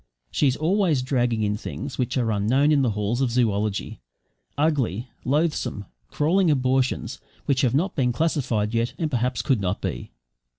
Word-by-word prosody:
She 145 - +2
is 130 - +2
always 165 -4 +2
dragging 120 -4 0
in 105 0 0
things 135 +4 -6
which 125 +1 -1
are 115 -3 +1
unknown 120 +9 +2
in 145 -2 +4
the 130 - +2
halls 105 +4 -1
of 130 - +2
zoology; 110 - 0 0.6
ugly, 135 - 0
loathsome, 145 -7 0 0.2
crawling 175 +4 +2
abortions 130 -2 0 0.3
which 135 -2 +2
have 125 -1 +2
not 180 +7 0
been 125 -4 +2
classified 120 -7 0
yet 115 +1 0
and 160 -3 -2
perhaps 125 -2 0
could 130 -7 +1
not 90 -2 -1
be. - - -4
130 Hz, 165 wpm, -24 LUFS, 115-145 Hz, 0.6 s, in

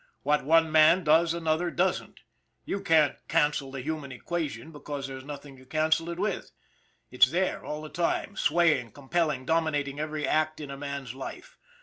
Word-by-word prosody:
What 150 0 +2
one 160 +2 +4
man 160 +4 +6
does 165 +2 +4
another 165 +1 0
doesn't. 180 +2 -1 0.4
You 200 - -3
can't 160 -6 +3
cancel 150 -2 +1
the 135 -1 -6
human 150 -2 -4
equation 160 +3 -4
because 145 -2 -6
there's 135 -1 -7
nothing 140 -1 -9
to 130 - -16
cancel 160 +3 +1
it 170 - -4
with; 200 +1 -2 0.6
it's 125 0 +6
there 180 +5 -1
all 150 +1 -5
the 155 - -7
time 170 +3 -1
swaying, 165 -9 +2
compelling, 150 -1 -1
dominating 150 -3 0
every 155 -1 -2
act 155 0 +1
in 145 -2 -7
a - - -5
man's 140 -3 -5
life. - - -8
155 Hz, 165 wpm, -28 LUFS, 140-165 Hz, 0.6 s, man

